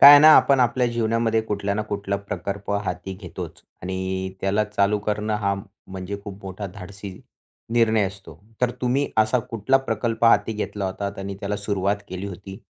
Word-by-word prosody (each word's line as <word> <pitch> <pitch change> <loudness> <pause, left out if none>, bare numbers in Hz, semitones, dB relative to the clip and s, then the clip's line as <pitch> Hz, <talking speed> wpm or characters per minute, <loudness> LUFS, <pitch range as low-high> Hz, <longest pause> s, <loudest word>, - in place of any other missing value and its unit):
काय 140 - +13
आहे 145 - +11
ना 155 - +9
आपण 135 -2 +5
आपल्या 125 +1 +3
जीवनामध्ये 115 -1 +1
कुठल्या 100 -2 -2
ना 105 - 0
कुठला 100 -1 -2
प्रकल्प 100 0 -5
हाती 90 +1 -4
घेतोच. 90 -2 -8 0.2
आणि 95 +1 -2
त्याला 100 +2 +2
चालू 105 0 +1
करणं 105 +1 -1
हा, 100 -1 0 0.3
म्हणजे 95 +1 -5
खूप 100 -1 -9
मोठा 95 +2 -5
धाडसी 100 0 -8 0.6
निर्णय 110 -3 +4
असतो. 95 -5 -10 0.2
तर 125 -1 +3
तुम्ही 130 +3 +1
असा 110 +3 +4
कुठला 115 +4 +3
प्रकल्प 115 0 0
हाती 110 -1 +5
घेतला 105 -1 -3
होतात 100 +1 -4
आणि 100 0 -4
त्याला 100 +1 -2
सुरुवात 100 -1 0
केली 95 +2 -5
होती? 95 0 -8
100 Hz, 170 wpm, -24 LUFS, 95-110 Hz, 0.6 s, काय